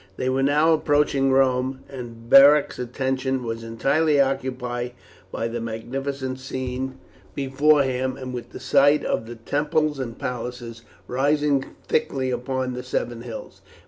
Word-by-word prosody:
They 130 - -1
were 130 +1 +1
now 150 +4 +4
approaching 145 -3 +2
Rome, 130 0 +2
and 120 -3 -9
Beric's 140 +3 +7
attention 130 +1 -2
was 115 -1 -4
entirely 140 +7 +1
occupied 125 -3 -1 0.4
by 115 - -2
the 115 0 -4
magnificent 130 +4 -4
scene 130 0 -4 0.4
before 140 +2 +3
him, 130 0 -2
and 130 -1 -6
with 120 -1 -6
the - - -9
sight 145 +1 +4
of 110 - -1
the 120 - -7
temples 150 +4 0
and 115 -3 -5
palaces 125 -3 -5 0.3
rising 140 +1 +1
thickly 135 -4 0
upon 130 +1 -2
the 125 - -4
seven 120 -2 -3
hills. 120 -2 -9
130 Hz, 140 wpm, -24 LUFS, 125-140 Hz, 0.4 s, Beric's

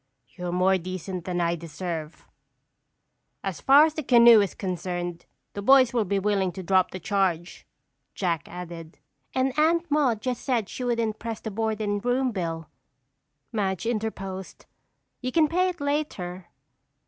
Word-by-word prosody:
"You're 180 -1 -5
more 185 +1 +3
decent 185 0 -6
than 180 -1 -2
I 170 0 +1
deserve." 165 -1 -6 1.2
"As 185 -7 -4
far 280 +3 +7
as 315 - -2
the 310 - -3
canoe 235 -4 +7
is 200 - -2
concerned, 175 -2 -4 0.3
the 200 - -5
boys 260 +2 +6
will 230 -3 +1
be 200 +1 0
willing 195 -2 +1
to 190 - -7
drop 185 0 +3
the 185 - -7
charge," 180 -2 -1 0.5
Jack 170 -4 -1
added. 170 -2 -8 0.4
"And 260 0 +1
Aunt 330 +1 +2
Madge 265 -8 +2
just 250 0 -2
said 235 -7 0
she 255 - -6
wouldn't 230 -3 -1
press 230 -2 -5
the 220 - -6
board 220 +1 -1
and 205 -1 -1
room 250 +1 +1
bill," 165 -5 -4 0.8
Madge 195 -2 -1
interposed. 200 -5 -4 0.6
"You 255 -1 -2
can 315 +2 +4
pay 365 +4 +2
it 355 - -6
later." 205 - -3
200 Hz, 155 wpm, -26 LUFS, 180-245 Hz, 1.2 s, far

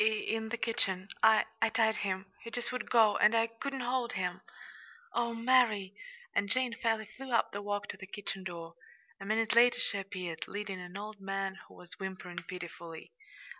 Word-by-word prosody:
"In 220 0 0
the 240 - -2
kitchen. 195 -5 +1
I 220 -1 +6 0.2
I 225 - +5
tied 220 -1 +3
him. 190 -1 -1 0.2
He 230 - -7
just 240 +1 -3
would 250 - -4
go, 225 -3 +6
and 215 +2 +5
I 225 0 +5
couldn't 260 +4 -5
hold 250 0 0
him." 180 -3 -2 0.7
"Oh, 235 -1 0
Mary!" 230 -5 +3 0.4
And 200 - +1
Jane 255 +1 +2
fairly 225 -2 0
flew 255 +5 -9
up 230 - +3
the 200 - -4
walk 205 0 -2
to - - -5
the 190 - -9
kitchen 195 -1 -5
door. 170 -2 -6 0.5
A 195 - -7
minute 220 +2 +2
later 240 +1 +7
she 200 - +1
appeared, 185 -4 -5
leading 200 -2 -4
an 180 +2 -7
old 210 0 -7
man, 195 0 -2
who - - -16
was 180 +2 -12
whimpering 185 -2 -5
pitifully. 170 - -8
210 Hz, 185 wpm, -32 LUFS, 190-230 Hz, 0.7 s, later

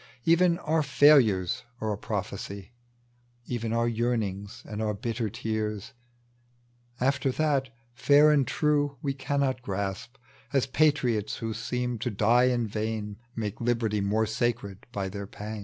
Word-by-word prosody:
Even 170 +1 +4
our 160 -1 0
failures 130 - +4 0.2
are 110 -1 -1
a - - -2
prophecy, 100 0 -5 0.7
Even 115 -2 -3
our 115 +1 +1
yearnings 110 -4 -2
and 105 0 -5
our 105 -1 -1
bitter 115 +1 -2
tears 110 +1 -3 1.1
After 135 +1 +1
that 140 -4 +1 0.2
fair 145 +4 +5
and 140 -3 +3
true 145 -2 +1
we 140 -2 0
cannot 135 -1 -1
grasp; 100 +3 -4 0.4
As 135 -2 +3
patriots 130 -7 +1
who 115 -1 -3
seem 125 +1 -3
to 125 +2 -1
die 115 +4 +3
in 120 -2 +1
vain 105 -1 -3 0.2
Make 105 -3 -3
hberty 115 -3 0
more 105 +3 +1
sacred 110 -3 -2
by 100 -4 -3
their 100 +1 -6
pangs. 105 +2 -7
115 Hz, 140 wpm, -28 LUFS, 105-135 Hz, 1.1 s, fair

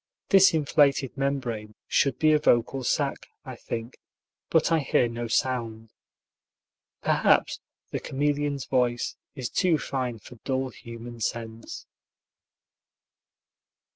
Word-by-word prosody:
This 195 -4 +6
inflated 145 -3 +2
membrane 125 -6 -2
should 135 -3 +2
be 155 -1 +4
a 150 - +4
vocal 130 -1 +2
sac, - - -1 0.2
I - - -7
think, 115 +1 -6 0.5
but - - +3
I 165 - +4
hear 130 -3 +2
no 115 0 -4
sound. 115 -2 -1 1.1
Perhaps - - +3 0.3
the - - -2
chameleon's 145 -1 -1
voice 125 -2 0 0.2
is 130 -4 -3
too 175 +2 +2
fine 130 -4 -3
for 120 +3 -14
dull 130 +2 -2
human 115 0 -10
sense. 115 +1 -5
130 Hz, 110 wpm, -26 LUFS, 115-140 Hz, 1.1 s, This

